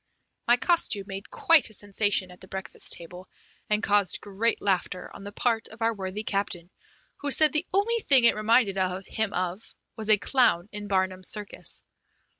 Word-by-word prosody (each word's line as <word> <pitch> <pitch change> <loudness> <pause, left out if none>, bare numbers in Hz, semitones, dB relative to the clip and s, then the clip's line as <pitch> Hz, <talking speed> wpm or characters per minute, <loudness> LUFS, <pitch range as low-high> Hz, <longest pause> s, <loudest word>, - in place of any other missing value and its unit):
My 240 +1 +5
costume 245 - +1
made 195 0 -8
quite 330 - +4
a 220 - -2
sensation 205 -2 -1
at 180 - -16
the 190 - -11
breakfast 190 0 -5
table, 180 +2 -9 0.4
and 210 0 +1
caused 205 -2 +2
great 205 +3 0
laughter 185 -2 -2
on - - -10
the 205 - -7
part 225 0 0
of 220 +1 -7
our 230 0 +2
worthy 195 +1 -5
captain, 195 -4 -3 0.5
who 285 - -3
said 310 +2 +5
the 305 +4 0
only 435 +5 +2
thing 275 - +4
it 235 - +6
reminded 215 -1 +2 0.3
him 220 -2 -2
of 185 +3 -4 0.2
was 220 -1 -6
a 215 - +7
clown 205 -6 +2
in 210 0 -7
Barnum's 185 -1 -1
circus. 210 -2 -3
205 Hz, 175 wpm, -26 LUFS, 190-235 Hz, 0.5 s, a